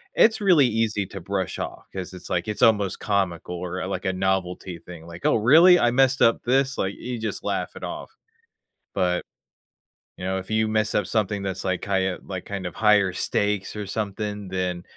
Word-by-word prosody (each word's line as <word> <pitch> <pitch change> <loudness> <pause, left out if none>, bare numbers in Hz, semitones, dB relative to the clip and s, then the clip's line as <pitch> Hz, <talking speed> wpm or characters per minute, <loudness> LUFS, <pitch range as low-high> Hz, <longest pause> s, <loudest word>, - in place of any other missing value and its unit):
it's 220 -1 +4
really 175 -9 +5
easy 110 -3 0
to 95 0 -9
brush 95 0 -3
off - - -6
'cause 95 -1 -5
it's 90 - -10
like, 90 -1 -1
it's 105 - -3
almost 105 -3 +3
comical 90 -4 -1
or, 90 +1 -4
uh, - - -3
like 95 -2 -4
a 95 - +2
novelty 90 -2 -2
thing, 85 -2 -11
like, 85 +1 -10
"Oh, - - +4
really? 160 +11 +7
I 120 - +3
messed 135 +1 +3
up 115 - +4
this?" 135 +2 +1
like, 95 +1 -1
you 125 -1 -5
just 110 -1 -4
laugh - - -2
it - - -10
off. - - -6 0.9
But, 90 -2 0 0.9
you - - -9
know, 95 +1 -1
if 95 +1 -7
you 110 0 +2
mess 110 0 0
up 105 - +1
something 105 -2 0
that's, 95 -1 -3
like, 95 -1 -1
highe 95 -2 0
like, 95 -2 -6
kind 100 -2 -5
of 90 - -5
higher 105 -3 +4
stakes 105 +1 -1
or 105 -1 -4
something, 105 -1 -4
then, 90 -2 -2
100 Hz, 200 wpm, -24 LUFS, 90-110 Hz, 0.9 s, really